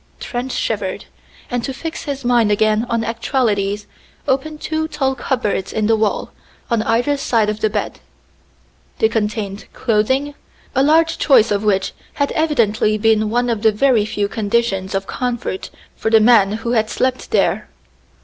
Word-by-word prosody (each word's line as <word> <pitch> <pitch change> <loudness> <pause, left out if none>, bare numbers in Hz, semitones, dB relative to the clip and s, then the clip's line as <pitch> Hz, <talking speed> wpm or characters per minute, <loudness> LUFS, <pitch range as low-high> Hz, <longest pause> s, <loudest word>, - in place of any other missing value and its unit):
Trent 245 +1 -4
shivered, - - -2 0.5
and 245 -1 -1
to 270 - -4
fix 325 +4 -6
his 280 -3 -4
mind 240 -3 +3
again 215 +2 +2
on 230 -1 0
actualities 215 -4 -1 0.4
opened 290 +3 -1
two 315 0 -2
tall 270 -4 -1
cupboards 240 -8 -2
in 215 - -1
the 225 +1 +4
wall 215 -1 -1 0.4
on 230 -2 +2
either 245 +6 +1
side 225 -6 +1
of 210 - -6
the 215 - +1
bed. 210 0 -3 1.0
They 220 - +3
contained 210 -2 -3
clothing, 260 +6 0 0.4
a 265 - +2
large 320 +3 +3
choice 250 -8 +4
of 205 0 0
which 195 -2 +1 0.2
had 285 -1 -1
evidently 225 -9 +1
been 215 0 +2
one 245 +2 +1
of 230 -3 -1
the 220 -1 +4
very 225 0 +3
few 205 -2 -1
conditions 205 -3 -1
of 195 0 -1
comfort 240 -6 -3 0.3
for 220 - -2
the 220 0 +6
man 215 -3 +5
who 225 +2 -3
had 220 -2 +1
slept 255 +1 -1
there. - - +1
225 Hz, 160 wpm, -19 LUFS, 210-260 Hz, 1.0 s, the